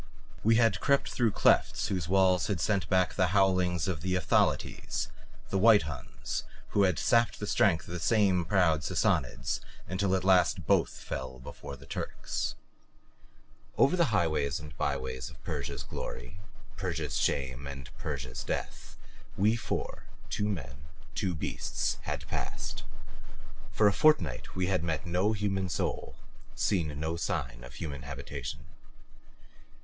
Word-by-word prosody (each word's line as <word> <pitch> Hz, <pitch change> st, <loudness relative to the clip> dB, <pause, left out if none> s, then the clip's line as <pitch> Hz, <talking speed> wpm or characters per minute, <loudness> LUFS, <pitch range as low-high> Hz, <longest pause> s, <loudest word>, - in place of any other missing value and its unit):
We 115 Hz, +1 st, +5 dB
had 115 Hz, -1 st, +4 dB
crept 140 Hz, -1 st, +2 dB
through 115 Hz, -4 st, +2 dB
clefts -, -, +3 dB
whose 90 Hz, -6 st, -1 dB
walls 95 Hz, -2 st, +4 dB
had 100 Hz, -5 st, -1 dB
sent 90 Hz, 0 st, 0 dB
back 95 Hz, -1 st, +3 dB
the 90 Hz, -2 st, +2 dB
howlings 90 Hz, -3 st, +3 dB
of 85 Hz, -6 st, -2 dB
the 90 Hz, +2 st, 0 dB
Ephthalites, 90 Hz, -, +1 dB, 0.4 s
the 95 Hz, -, +2 dB
White 105 Hz, -3 st, +7 dB
Huns 75 Hz, -4 st, -5 dB, 0.3 s
who 100 Hz, -, +2 dB
had 90 Hz, -5 st, +2 dB
sapped 115 Hz, -1 st, +3 dB
the 105 Hz, -, -3 dB
strength 95 Hz, -4 st, +3 dB
of -, -, -8 dB
these 90 Hz, -, -4 dB
same 100 Hz, -3 st, +3 dB
proud 85 Hz, -3 st, +3 dB
Sassanids -, -, 0 dB, 0.3 s
until 95 Hz, +1 st, +1 dB
at 95 Hz, -, -1 dB
last 95 Hz, -1 st, +4 dB
both -, -, +4 dB
fell 65 Hz, -1 st, -6 dB
before 65 Hz, +2 st, -8 dB
the 65 Hz, -, -14 dB
Turks. -, -, -3 dB, 1.2 s
Over 140 Hz, -, +5 dB
the 170 Hz, -2 st, +4 dB
highways 80 Hz, -, +1 dB
and 75 Hz, -3 st, -10 dB
byways 65 Hz, -1 st, -2 dB
of -, -, -16 dB
Persia's -, -, -4 dB
glory, 65 Hz, +9 st, -7 dB, 0.4 s
Persia's -, -, -2 dB
shame 70 Hz, 0 st, -1 dB
and 70 Hz, -1 st, -8 dB
Persia's 65 Hz, -3 st, -4 dB
death -, -, -5 dB, 0.4 s
we 105 Hz, +4 st, +4 dB
four 115 Hz, -, -4 dB, 0.3 s
two 105 Hz, +1 st, 0 dB
men, 70 Hz, -8 st, -5 dB, 0.3 s
two 90 Hz, -3 st, -1 dB
beasts 75 Hz, -, -2 dB
had -, -, -4 dB
passed. -, -, -4 dB, 0.9 s
For 105 Hz, -, +4 dB
a 100 Hz, -, +4 dB
fortnight 90 Hz, -, +2 dB
we 95 Hz, -, +1 dB
had 90 Hz, -2 st, +1 dB
met 80 Hz, -3 st, -2 dB
no 90 Hz, +5 st, +1 dB
human 95 Hz, -2 st, -1 dB
soul, -, -, -2 dB, 0.4 s
seen 80 Hz, -7 st, 0 dB
no 80 Hz, +2 st, -1 dB
sign -, -, -3 dB
of 65 Hz, +1 st, -11 dB
human 75 Hz, -5 st, -5 dB
habitation. 70 Hz, 0 st, -6 dB
90 Hz, 145 wpm, -30 LUFS, 70-100 Hz, 1.2 s, White